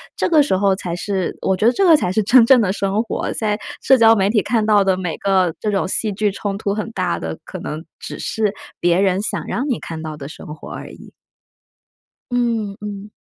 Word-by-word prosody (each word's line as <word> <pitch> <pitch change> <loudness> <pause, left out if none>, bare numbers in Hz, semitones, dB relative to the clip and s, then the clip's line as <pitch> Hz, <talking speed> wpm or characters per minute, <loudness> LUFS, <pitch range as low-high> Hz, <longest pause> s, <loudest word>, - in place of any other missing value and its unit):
这 - - 0
个 315 -3 +5
时 285 -9 +1
候 195 0 +2
才 175 -3 -4
是 190 0 -3
我 190 - +1
觉 210 - 0
得 235 - +6
这 390 - +2
个 330 -3 +7
才 180 - -1
是 215 +3 +1
真 240 +3 +6
正 250 0 +6
的 195 -4 +1
生 200 +2 0
活， 230 - -3
在 210 -1 -1 0.2
社 265 - +5
交 225 -1 +6
媒 195 -2 +2
体 215 -1 +3
看 220 0 0
到 210 -2 +4
的 190 -1 +2
每 180 -3 -3
个 185 -4 +1
这 215 - -2
种 195 -2 0
戏 215 +3 0
剧 210 +1 0
冲 200 0 -4
突 200 -1 -2
很 215 +2 -3
大 185 -5 -1
的， 80 -1 -5
可 - - -8
能 155 +1 -6 0.2
只 - - -7
是 215 -2 -1 0.3
别 175 +1 +2
人 190 -1 +2
想 210 - -3
让 260 +4 -2
你 250 - 0
看 160 -1 -7
到 155 -1 -6
的 140 -1 -7
生 - - -11
活 - - -11
而 - - -7
已。 - - -14 1.2
嗯， 230 -5 -1
嗯。 205 0 -7
200 Hz, 250 characters per minute, -19 LUFS, 185-225 Hz, 1.2 s, 个